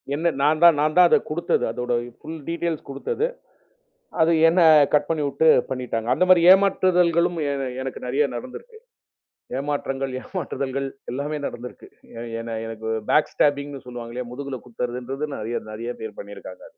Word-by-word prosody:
என்ன 165 +3 +1
நான் 155 +3 +2
தான் 170 -3 +8
நான் 155 +1 +1
தான் 180 - +8
அத - - +6
குடுத்தது. 170 +3 0
அதோட 125 +1 -3 0.3
ஃபுல் 160 +1 -7
டீடைல்ஸ் 170 -2 -3
குடுத்தது. 140 - -2 1.0
அது 160 +1 +4 0.2
என்ன 175 +2 +3 0.3
கட் 145 0 +3
பண்ணி 160 -2 0
விட்டு 160 +3 +2 0.2
பண்ணிட்டாங்க. 125 -3 -3
அந்த 185 - +2
மாதிரி 175 -2 +7
ஏமாற்றுதல்களும் 180 -3 +3
என 135 -2 -2
எனக்கு 130 0 -6
நிறைய 140 +4 +2
நடந்திருக்கு. 445 - -9 0.8
ஏமாற்றங்கள், 135 -2 -3
ஏமாற்றுதல்கள் 140 -7 -4 0.3
எல்லாமே 145 +3 -3
நடந்திருக்கு. 120 +1 -8 0.3
எ - - -6 0.2
என்ன 115 -1 -5
எனக்குப் 110 -1 -4
பேக் 150 - +3
ஸ்டேப்பிங்ன்னு 145 -1 0
சொல்லுவாங்க 120 -1 -8
இல்லயா? 125 -1 -5
முதுகுல 140 0 -5
குத்துறதுன்றது 125 +4 -4
நிறைய 115 +2 -3
நிறைய 115 +3 -5
பேர் 110 -2 -7
பண்ணி 100 0 -10
இருக்காங்க. 95 -1 -11
140 Hz, 150 wpm, -23 LUFS, 125-165 Hz, 1.0 s, தான்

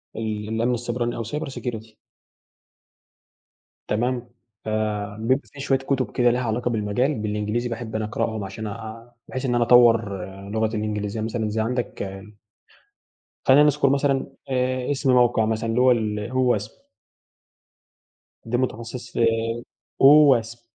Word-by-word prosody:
ال 110 -1 -4
الأمن 115 +2 0
السيبراني 120 0 -2
أو 115 - -3
cyber 145 +7 -4
security. 110 -3 -6 1.9
تمام، 120 +2 -1 0.4
فبيبقى 110 +4 -1
في 145 - -12
شوية 135 -1 +1
كُتُب 135 -3 -2
كده 120 -1 +3
ليها 125 +1 +1
علاقة 120 +1 -1
بالمجال 115 +6 0
بالإنجليزي، 105 +2 -2
باحب 115 -1 -5
أنا 110 - -2
أقرأهم 110 0 -2
عشان 110 +3 -6
آآ، 115 +3 -8
بحيث 130 +1 -5
إن 125 -2 0
أنا 120 0 +3
أطوّر 115 -5 +4 0.3
لغتي 110 +1 0
الإنجليزية 105 0 -3
مثلًا 110 0 -2
زي 110 +1 -2
عندك 120 +1 -2 1.4
خلّينا 135 +2 +7
نذكُر 150 -1 +3
مثلًا 140 -1 +1 0.2
آآ 130 0 -1
إسم 140 -2 +1
موقِع 120 -3 +4
مثلًا، 110 +1 -1
اللي 115 +2 +1
هو 130 0 +6
ال 105 -1 -2 0.3
OWASP. 105 +2 -12 1.6
ده 120 +2 -1
متخصص 120 -1 -4
في - - -2 0.8
OWASP. 130 -5 +6
115 Hz, 130 wpm, -23 LUFS, 110-125 Hz, 1.9 s, خلّينا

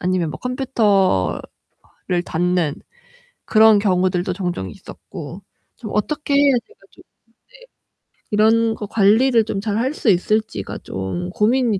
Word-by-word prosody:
아니면 180 -3 0
컴퓨터를 215 - 0 0.6
닫는 175 -3 0 0.7
그런 220 -1 +5
경우들도 185 -2 0
종종 175 - -4
있었고 155 - -10 0.4
좀 215 -5 -8
어떻게 290 +7 -1
해야 280 -1 +5
제가 445 - -24
좀 - - -19
네. - - -56 1.2
이런 225 +2 +3
거 210 - -6
관리를 225 +4 +3
좀 200 - -3
잘 210 -1 -2
할 260 +6 0
수 250 - 0
있을지가 205 - 0
좀 95 - -5
고민이 225 0 +1
210 Hz, 245 characters per minute, -20 LUFS, 180-230 Hz, 1.2 s, 그런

